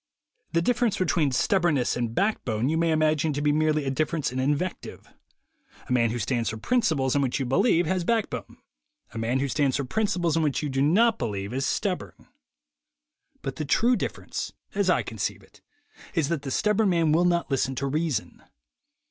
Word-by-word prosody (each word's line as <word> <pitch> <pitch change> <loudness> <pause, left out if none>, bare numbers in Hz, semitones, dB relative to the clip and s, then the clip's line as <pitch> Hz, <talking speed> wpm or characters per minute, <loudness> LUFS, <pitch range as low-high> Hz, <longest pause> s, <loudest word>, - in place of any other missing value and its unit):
The 170 0 +2
difference 240 -1 +1
between 165 -5 +1
stubbornness 155 -2 +1
and 120 -2 -3
back 210 +3 +1
bone 115 +2 -1
you 160 - +1
may 165 0 +1
imagine 155 -1 +2
to 145 - -2
be 150 - +3
merely 155 -1 +1
a 135 - 0
difference 155 +1 -1
in 130 - -3
invective. 145 +7 -3 0.7
A - - -7
man 115 -2 +3
who 120 - -3
stands 120 +1 -1
for 110 - -5
principles 145 - +1
in 145 - +3
which 135 +1 0
you 135 - -1
believe, 175 - +3
has 185 +2 0
backbone; 225 +4 -2 0.6
a 115 - -5
man 120 +4 0
who 140 - 0
stands 140 -1 +1
for 140 - -2
principles 175 - 0
in 165 - +2
which 150 -1 0
you 150 - -1
do 135 0 -1
not 220 +10 +3
believe, 100 -1 -3
is 135 +2 -1
stubborn. 190 -3 -3 1.2
But 135 -1 -4
the 155 - -2
true 235 - +3
difference, - - -4 0.2
as 200 -1 +1
I 180 - +3
conceive 110 -4 -4
it, - - -22 0.5
is 155 -3 +1
that 170 -4 -1
the 140 - -5
stubborn 210 +8 +2
man 165 -3 +2
will 170 +3 +3
not 170 -3 +1
listen 135 0 0
to 140 - -2
reason. 150 0 -2
155 Hz, 190 wpm, -26 LUFS, 130-175 Hz, 1.2 s, be